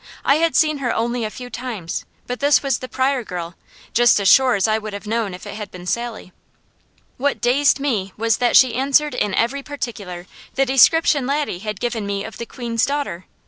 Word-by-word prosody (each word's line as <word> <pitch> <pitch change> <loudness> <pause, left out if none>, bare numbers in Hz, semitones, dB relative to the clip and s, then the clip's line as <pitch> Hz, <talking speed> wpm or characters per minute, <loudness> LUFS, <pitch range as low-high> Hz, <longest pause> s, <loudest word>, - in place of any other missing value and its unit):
I 280 - +4
had 330 +1 +1
seen 310 -2 +3
her 250 -3 -1
only 235 +1 -1
a - - -3
few 245 +3 -9
times, 225 -9 -5 0.2
but 250 0 -5
this 285 +1 +3
was 270 -4 0
the 255 - -7
Pryor 260 -1 0
girl, 175 -4 -6 0.4
just 240 -2 +5
as 200 - 0
sure 260 +6 +6
as 200 +1 +1
I 215 0 +1
would 215 -1 -7
have 200 +1 -7
known 215 -3 -2
if 180 - -12
it - - -7
had 210 -1 -7
been 180 -1 -11
Sally. 230 -2 -4 0.8
What 285 +2 0
dazed 275 +4 +3
me 220 -9 -1
was 225 -1 +1
that 245 -1 +4
she 255 -3 +5
answered 280 +4 +2
in 205 -2 -1
every 265 +5 0
particular 215 -11 -6 0.3
the 270 - +2
description 270 +1 +4
Laddie 285 -9 -1
had 210 0 -5
given 235 -4 -3
me 200 0 -2
of 220 - -9
the 235 - -5
Queen's 235 -3 -3
daughter. 280 -11 -2
240 Hz, 210 wpm, -20 LUFS, 210-275 Hz, 0.8 s, sure